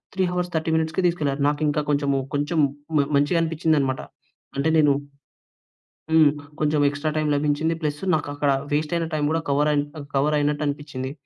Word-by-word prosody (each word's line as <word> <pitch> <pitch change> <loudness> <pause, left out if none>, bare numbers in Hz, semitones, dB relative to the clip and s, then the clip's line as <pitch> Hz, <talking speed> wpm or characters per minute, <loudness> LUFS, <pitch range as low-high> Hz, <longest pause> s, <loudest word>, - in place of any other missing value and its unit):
3:30 180 -3 -1
మినిట్స్‌కి 160 +3 -1
తీసుకెళ్లారు. 150 -5 -1
నాకింకా 150 0 0
కొంచెము, 140 -1 +1 0.2
కొంచెం 145 +3 0 0.4
మ - - +4 0.2
మంచిగనిపించిందనమాట. 155 -3 +1 0.6
అంటే 150 +4 +1
నేను 145 -2 +5 1.2
హ్మ్, 160 -2 +6 0.3
కొంచెం 150 -1 +2
ఎక్స్ట్రా 145 +2 -3
టైమ్ 155 -1 0
లభించింది. 150 +3 +1
ప్లస్సు 150 +3 -2
నాకక్కడ 145 -1 -1 0.2
వేస్టయిన 155 +3 0
టైమ్ 150 -1 0
గూడా 165 +1 0
కవరయిన్ 145 0 +2
ఆహ్, 140 - -9
కవరయినట్టు 150 +1 +1
అనిపిచ్చింది. 140 -2 -4
150 Hz, 130 wpm, -23 LUFS, 145-160 Hz, 1.2 s, హ్మ్